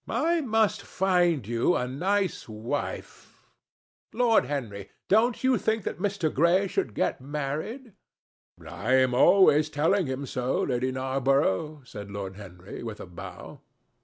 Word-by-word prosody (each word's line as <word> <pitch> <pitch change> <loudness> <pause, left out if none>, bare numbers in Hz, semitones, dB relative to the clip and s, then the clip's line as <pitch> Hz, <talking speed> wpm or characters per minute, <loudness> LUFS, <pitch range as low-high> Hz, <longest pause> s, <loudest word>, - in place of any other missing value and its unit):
I 335 +1 +1
must 220 -5 +1
find 175 - +1
you 120 +9 +1
a 125 - -1
nice 185 - -1
wife. 110 +6 -5 0.7
Lord 235 -1 +3
Henry, 110 -9 -5 0.2
don't 225 +4 +2
you 260 -2 +3
think 220 -1 0
that - - -4
Mr. 195 -6 -1
Gray 170 +6 +3
should 115 - -2
get - - -1
married?" 150 - -5 0.7
"I 110 +8 -2
am 130 -1 +3
always 155 +1 +5
telling 160 +4 +1
him 130 +1 -3
so, 125 0 -1
Lady 130 0 -1
Narborough," 135 +1 0
said 105 -4 -9
Lord 100 -1 -6
Henry 95 -2 -10
with 115 -2 -6
a - - -7
bow. 90 -1 -10
145 Hz, 135 wpm, -27 LUFS, 125-195 Hz, 0.7 s, always